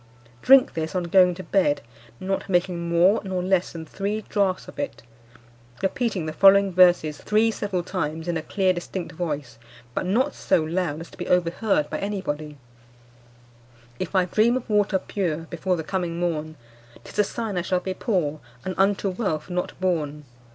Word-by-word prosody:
Drink 265 0 +6
this 160 +2 -3
on 180 - 0
going 180 +1 +4
to 185 - -8
bed, 180 -8 +1 0.4
not 195 +1 -3
making 175 -2 0
more 175 +5 +4
nor 185 -2 -2
less 185 -1 +1
than 165 -1 -7
three 205 +6 -3
draughts 200 -3 -1
of - - -11
it; 285 - -4 0.8
repeating 195 -3 -1
the 155 - -4
following 195 +2 +6
verses 175 -4 +4
three 220 +2 +2
several 195 -5 -2
times 165 -3 -3
in 175 - 0
a 160 - -1
clear 190 +3 +1
distinct 175 0 -5
voice, 150 -8 -4 0.3
but 180 - -2
not 255 +9 +1
so 160 - +1
loud 165 -1 -2
as 165 - -10
to - - -16
be - - -4
overheard 190 - +1
by - - -2
any 200 0 -2
body: 150 -3 -5 1.4
'If 185 - -4
I 185 -1 +4
dream 220 +7 +3
of 255 - -7
water 210 -2 +2
pure 170 -5 -3
Before 180 +2 0
the 160 - -3
coming 175 0 -3
morn, 155 -3 -2 0.5
'Tis - - -8
a - - +7
sign 220 0 -4
I 180 - +1
shall 180 +1 0
be 190 +1 -4
poor, 170 - -1 0.3
And 185 - -2
unto 200 +1 +2
wealth 180 -5 -2
not 180 0 -3
born. 150 -5 -1
185 Hz, 180 wpm, -24 LUFS, 165-195 Hz, 1.4 s, a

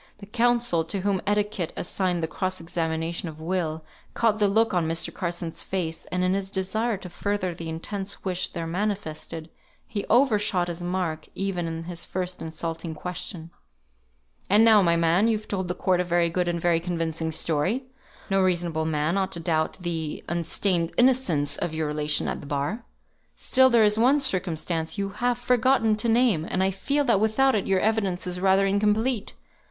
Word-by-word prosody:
The 205 - -11
counsel 235 -5 +2
to 195 +4 -3
whom 195 -1 0
etiquette 205 -4 0
assigned 175 -1 -1
the - - 0
cross 185 +3 -2
examination 165 0 -2
of 155 -1 -11
Will, 160 -2 -2 0.3
caught 220 -2 +2
the 205 - +4
look 220 +2 +2
on 175 -3 +1
Mr. 165 0 -1
Carson's 170 -2 -3
face, 165 -4 -3
and 180 0 0
in 185 0 +2
his 195 0 -2
desire 205 +4 -1
to 185 - -9
further 185 0 -2
the 165 -1 -7
intense 195 +5 -5
wish 185 -1 0
there 170 -2 -5
manifested, 165 -3 -4 0.3
he 205 -4 -4
over 240 -2 +4
shot 180 -4 0
his 170 0 -5
mark 175 -3 -2
even 190 -3 -2
in 165 0 -4
his 170 0 -5
first 180 0 -4
insulting 165 0 -4
question: 175 0 -6 1.0
"And 210 +3 +6
now, 220 -2 +7
my 170 -2 +3
man, 170 +5 +3
you've 215 -2 -1
told 190 -2 -2
the 180 - -2
court 180 -1 +1
a - - +2
very 175 -1 +1
good 180 +1 0
and 170 -1 -1
very 170 -1 +2
convincing 165 -2 -2
story; 160 - 0 0.4
no 195 -1 +2
reasonable 175 -4 0
man 160 +4 0
ought 190 - -1
to 170 - -2
doubt 160 -1 0
the 165 -3 -3
unstained 170 +1 0
innocence 195 - +3
of 160 - -3
your 160 0 -1
relation 150 0 0
at - - -3
the - - -10
bar. 145 - -2 0.5
Still 260 0 +4
there 235 -3 +5
is 210 +1 +3
one 265 +5 +5
circumstance 175 - -1
you 200 0 -1
have 240 +4 -1
forgotten 245 -2 +3
to 230 +2 0
name; 225 -8 +3
and 190 - 0
I 190 - +2
feel 280 +10 0
that 230 -7 +3
without 240 +5 +3
it 205 - 0
your 190 -1 +3
evidence 200 -5 0
is 180 0 -3
rather 190 +1 +4
incomplete. 210 +4 +1
180 Hz, 185 wpm, -25 LUFS, 165-210 Hz, 1.0 s, now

